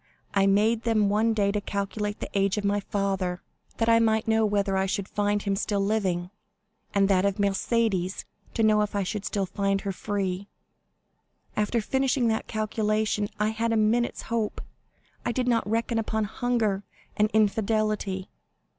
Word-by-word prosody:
I 195 0 +3
made 215 +3 +3
them 220 -3 +2
one 220 +2 +2
day 200 -2 +2
to 205 0 -1
calculate 205 +1 -3
the - - -4
age 195 +1 +2
of 210 - -1
my 200 +1 +2
father, 195 -3 -2 0.3
that 225 - +1
I 230 0 +6
might 220 0 +2
know 220 -1 +3
whether 200 -1 +1
I 190 0 +1
should 195 0 -2
find 205 0 0
him 200 -1 0
still 205 0 -1
living, 190 -4 0 0.6
and 195 -1 +3
that 190 -2 +3
of 200 -1 +1
Mercédès, 200 -1 0 0.3
to 225 - +1
know 215 -1 +4
if 210 0 -2
I 200 - +1
should 200 +2 -4
find 195 0 -1
her 200 - -2
still 185 - -13
free. 200 -2 -2 1.1
After 215 +2 +1
finishing 265 +1 +1
that 220 0 -1
calculation, 215 -1 0
I 210 0 +2
had 225 +1 -1
a 225 - +2
minute's 225 +3 +1
hope. 230 -2 -2 0.6
I 240 - 0
did 250 +1 -1
not 230 -3 +1
reckon 230 +1 0
upon 220 0 -1
hunger 215 -2 0 0.3
and 210 +1 +3
infidelity!" 215 -2 0
210 Hz, 170 wpm, -26 LUFS, 200-220 Hz, 1.1 s, I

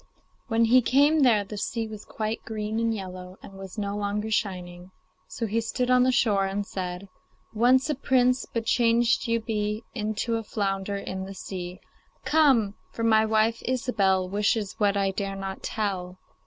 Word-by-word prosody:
When 230 -1 +3
he 250 +3 +6
came 285 +6 +4
there 235 -7 +4
the 205 +1 -7
sea 225 +1 -2
was 215 -1 -9
quite 215 0 -3
green 215 0 -3
and 230 0 +1
yellow, 185 -3 -7
and - - -11
was 195 +1 -10
no 200 -1 -2
longer 210 +1 -2
shining. 180 -4 -3 0.4
So 230 - -4
he 225 +2 0
stood 250 +2 -1
on 250 0 +5
the 255 +1 +4
shore 205 -6 +2
and 200 +1 -2
said: 185 0 -5 0.5
'Once 250 +4 +4
a 305 - +1
prince, 255 -2 +2
but 230 -1 -2
changed 235 0 +2
you 230 0 +1
be 215 -1 -2
Into 220 0 -1
a 225 - -4
flounder 200 -2 -2
in 190 -1 -5
the 195 0 -8
sea. 185 -1 -7 0.4
Come! 270 -10 +4 0.2
for 230 - -5
my 220 -1 +4
wife, 220 +1 +2
Ilsebel, 200 -7 +1
Wishes 205 +1 0
what 205 -1 +2
I 195 -1 +1
dare 195 0 -3
not 195 0 -6
tell. 185 -4 -3
215 Hz, 175 wpm, -26 LUFS, 195-230 Hz, 0.5 s, he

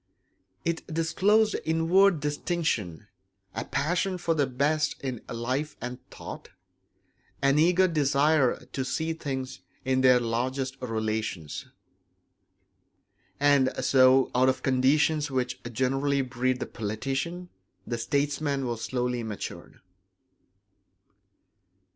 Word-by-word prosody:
It 170 -1 -2
disclosed 200 +7 +2
inward 165 +2 +3
distinction; 145 - -2 0.5
a 115 - -3
passion 180 +6 0
for 170 -1 0
the 145 -4 +1
best 150 +4 0
in 130 -4 -4
life 130 +6 -3
and 125 +1 -6
thought; - - -9 0.9
an 140 +1 +3
eager 180 +3 +4
desire 150 -3 +2
to 130 - -1
see 160 +5 -2
things 135 -5 -5 0.3
in 130 0 +2
their 125 -1 +6
largest 130 +3 -2
relations. 110 - -3 1.7
And 140 -2 +4 0.2
so 130 0 +5
out 130 +1 +4
of 130 - -2
conditions 145 +4 +2
which 130 -2 -2
generally 135 +3 +1
breed 125 0 -1
the - - -2
politician 135 +11 -4 0.4
the 120 0 -3
statesman 140 +1 -1
was 120 -2 -3
slowly 125 -1 -1
matured. 110 -3 -7
135 Hz, 105 wpm, -27 LUFS, 125-155 Hz, 1.7 s, their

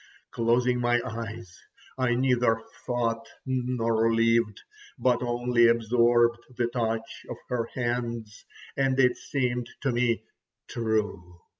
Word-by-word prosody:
Closing 125 +2 +2
my 120 0 +2
eyes, 115 -4 -7 0.4
I 125 -2 +1
neither 125 -3 +2 0.3
thought 115 -2 -1 0.2
nor 120 -3 +1
lived, 115 -2 +2 0.4
but 125 -1 +2
only 120 -1 +3
absorbed 120 +1 +3 0.2
the 120 - +2
touch 115 -2 -3
of - - -5
her 120 -2 -1
hands, 120 -3 -3 0.3
and 135 -1 +1
it 125 -2 +5
seemed 125 -4 -2
to 135 - +1
me 120 -2 +1 0.4
true. 105 -6 -2
120 Hz, 115 wpm, -27 LUFS, 115-125 Hz, 0.4 s, it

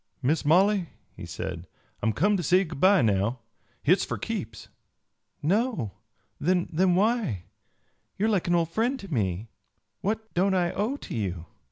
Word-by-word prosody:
"Miss 150 +6 +2
Molly," 185 +3 +3 0.3
he - - -8
said, 90 -2 -5 0.3
"I'm 110 - +2
come 205 - +2
to 185 - 0
say 180 +4 +4
good 155 -6 -7
by 190 -4 +5
now. 110 +3 +1 0.4
Hit's 180 +6 +4
for - - -3
keeps." 115 - -5 0.8
"No? 190 - +1 0.5
Then 180 +1 +2
why? 205 - +1 0.7
You 205 - +1
are - - +3
like 195 -6 +1
an 175 - +3
old 165 -1 +1
friend 245 +7 0
to 195 -7 -7
me. 105 -2 -1 0.5
What 220 +2 -3
don't 190 +2 +2
I 175 -2 +2
owe 225 +8 -1
to - - -7
you?" 90 -6 -3
175 Hz, 160 wpm, -27 LUFS, -, 0.8 s, by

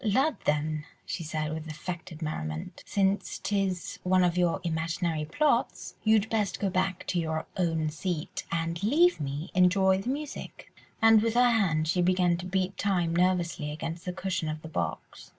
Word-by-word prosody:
"Lud, 265 +8 +2
then," 150 +1 0 0.2
she - - -4
said, 155 0 -2
with 160 0 -5
affected 165 +1 -6
merriment, 80 - -4
"since 195 0 +1
'tis 195 -3 -2
one 185 0 +3
of 175 -1 +2
your 175 -2 +2
imaginary 165 -1 -1
plots, 260 - 0
you'd 220 -1 +4
best 205 -5 0
go 195 -2 0
back 185 0 -1
to 180 - 0
your 160 -1 -2
own 165 -4 0
seat 160 +1 -3
and 165 0 -1
leave 320 - +4
me 145 +4 -4
to - - -8
enjoy 190 +1 +4
the 240 - -4
music." 290 +2 -6 0.3
And 225 -1 +7
with 230 +1 0
her 245 0 +5
hand 165 -9 +2
she 180 +3 +2
began 180 -1 +3
to 180 +1 -6
beat 190 0 -1
time 175 -4 +1
nervously 175 -4 +1
against 165 +3 -5
the 180 - -2
cushion 180 -3 -2
of 155 0 -5
the - - -6
box. 85 - -4
180 Hz, 175 wpm, -28 LUFS, 160-195 Hz, 0.3 s, And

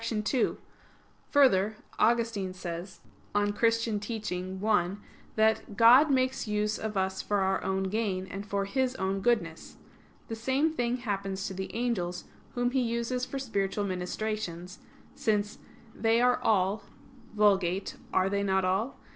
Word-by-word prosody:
2: 230 +2 0 0.7
Further, 220 -7 +4 0.2
Augustine 225 -5 +1
says 175 +1 -7 0.3
(De 205 - +4
Doctr. 205 0 0
Christ. 210 -4 -1
i) 195 -3 +2 0.4
that 220 -1 +1
"God 245 +6 +7
makes 260 -2 +1
use 210 0 0
of 215 -2 -3
us 190 0 0
for 205 -1 0
our 190 0 +1
own 190 0 0
gain, 190 -2 -1
and 195 +1 -6
for 200 -1 -2
His 260 +4 0
own 190 -1 -1
goodness. 240 +2 -1 0.5
The 225 - -4
same 265 +7 +1
thing 245 -3 0
happens 195 -5 -3
to 190 - -4
the 190 +1 -5
angels, 195 -8 -1 0.3
whom 245 0 +1
He 260 0 +1
uses 235 +1 -1
for 275 - -5
spiritual 205 -6 -1
ministrations"; 185 -1 -4 0.3
since 210 -1 -1 0.3
"they 225 +1 +2
are 250 0 +3
all 200 0 +2 0.5
[*Vulg.: 195 -3 +2 0.2
'Are 185 0 +2
they 200 +1 0
not 190 -1 +1
all 195 +8 0
210 Hz, 140 wpm, -29 LUFS, 190-235 Hz, 0.7 s, God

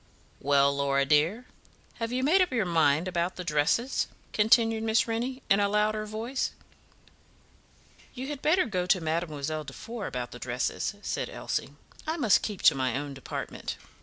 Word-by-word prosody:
"Well, 140 0 +3
Laura 140 0 +1
dear, 160 - +2 0.5
have 230 0 -3
you 255 +1 -1
made 345 +8 +5
up 365 - +2
your 230 -6 +1
mind 160 -1 +3
about 175 0 -1
the 180 - -5
dresses?" 165 - +1 0.3
continued 225 +1 +4
Miss 225 +2 +2
Rennie, 245 +4 -3
in 195 - +4
a 200 0 +2
louder 215 +1 +1
voice. 230 +5 -3 1.6
"You 255 +1 -5
had 290 -2 -5
better 355 +3 +3
go 185 -6 -2
to 185 - +4
Mademoiselle 155 -2 -2
Defour 205 - -7
about 125 -1 -4
the 120 - -9
dresses," 125 - -2
said - - -2
Elsie. - - -4 0.3
"I 320 +2 -1
must 235 -10 +4
keep 205 -4 -5
to - - +8
my 130 -2 -1
own 145 0 -4
department." 135 - -6
195 Hz, 165 wpm, -28 LUFS, 145-230 Hz, 1.6 s, to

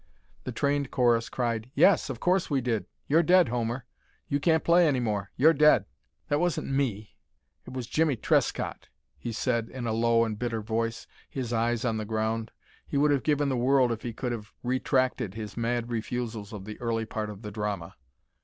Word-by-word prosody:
The - - -3
trained 140 -1 0
chorus 120 -3 +2
cried: 120 -2 -2
"Yes, 195 -7 +5
of 125 -4 -5
course 185 +1 +1
we 140 -3 +2
did. 120 -4 -1 0.2
You're 160 +4 +4
dead, 180 -3 +5
Homer. 120 +1 -2 0.4
You 140 - 0
can't 160 +2 +2
play 170 0 +5
any 135 -4 +2
more. 105 -5 -2
You're 160 +5 +6
dead." 150 +1 +5 0.4
"That 145 - +1
wasn't 175 -4 -1
me. 115 -7 -2 0.5
It - - -8
was 130 -2 -4
Jimmie 155 +3 +1
Trescott," 110 - 0 0.3
he 120 - -5
said, 115 0 -1
in 130 -2 -6
a 115 - 0
low 115 0 +3
and 110 -2 -4
bitter 115 -3 -2
voice, 115 +1 -2 0.2
his 125 -3 -4
eyes 115 +1 0
on 115 -2 0
the 110 - -2
ground. 110 +1 -1 0.4
He 140 - -2
would 145 +1 +4
have 140 -2 +2
given 145 -1 +1
the 130 - 0
world 130 0 +3
if 115 -1 -3
he 120 - -4
could 125 +2 -3
have 110 -3 -6
retracted 130 -4 0
his 105 -2 -6
mad 120 0 -1
refusals 115 -2 -3
of 100 -3 -7
the 105 +2 -8
early 115 -1 -1
part 110 -1 -4
of 105 0 -9
the 105 - -6
drama. 105 -5 -4
120 Hz, 195 wpm, -28 LUFS, 110-135 Hz, 0.5 s, You're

